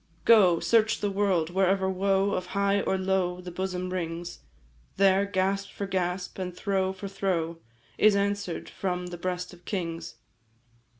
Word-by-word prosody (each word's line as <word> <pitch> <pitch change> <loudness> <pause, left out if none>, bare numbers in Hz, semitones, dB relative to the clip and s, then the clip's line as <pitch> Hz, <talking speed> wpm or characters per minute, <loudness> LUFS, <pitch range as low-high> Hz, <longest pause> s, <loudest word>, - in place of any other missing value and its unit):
"Go, 190 -7 +6
search 220 -2 +3
the 205 -1 -1
world, 190 -5 +1
wherever 190 +1 +2
woe 195 +1 +1
Of 185 -2 -2
high 200 0 +2
or 190 - 0
low 185 -1 0
the 180 0 -8
bosom 185 0 -3
wrings, 170 -1 -4 0.6
There, 195 0 +4
gasp 195 0 0
for 200 - -5
gasp, 180 -1 -2
and 180 -1 -5
throe 190 -2 0
for 190 +1 -7
throe, 170 -4 -2 0.4
Is 215 -1 +6
answer'd 200 -3 -1
from 180 -2 -3
the - - -5
breast 180 0 -3
of 175 0 -16
kings. 165 - -4
190 Hz, 155 wpm, -27 LUFS, 180-200 Hz, 0.6 s, Go